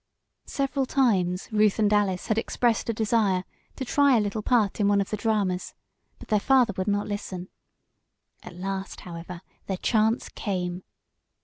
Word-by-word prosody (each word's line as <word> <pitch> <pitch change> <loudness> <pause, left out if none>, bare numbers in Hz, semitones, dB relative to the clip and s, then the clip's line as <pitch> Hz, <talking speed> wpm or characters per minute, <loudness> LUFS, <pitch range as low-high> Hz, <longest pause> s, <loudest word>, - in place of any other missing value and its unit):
Several 275 -1 -1
times 190 -10 +1
Ruth 210 -1 +3
and 210 -1 +2
Alice 195 -3 +1
had 220 -1 +1
expressed 235 0 0
a - - +4
desire 210 -4 +1 0.3
to 265 - -4
try 280 0 +4
a - - +3
little 210 +1 -2
part 220 -3 +1
in 205 - +3
one 205 0 +3
of 200 - -2
the - - +1
dramas, 205 -4 -1 0.4
but - - -14
their 210 -2 +3
father 250 -1 +3
would 185 - -3
not 205 0 +1
listen. 190 -3 -5 0.9
At - - -11
last, 195 +1 -5
however, 170 0 -8 0.3
their 190 - -2
chance 220 +4 +1
came. 180 -3 -3
205 Hz, 165 wpm, -26 LUFS, 190-225 Hz, 0.9 s, a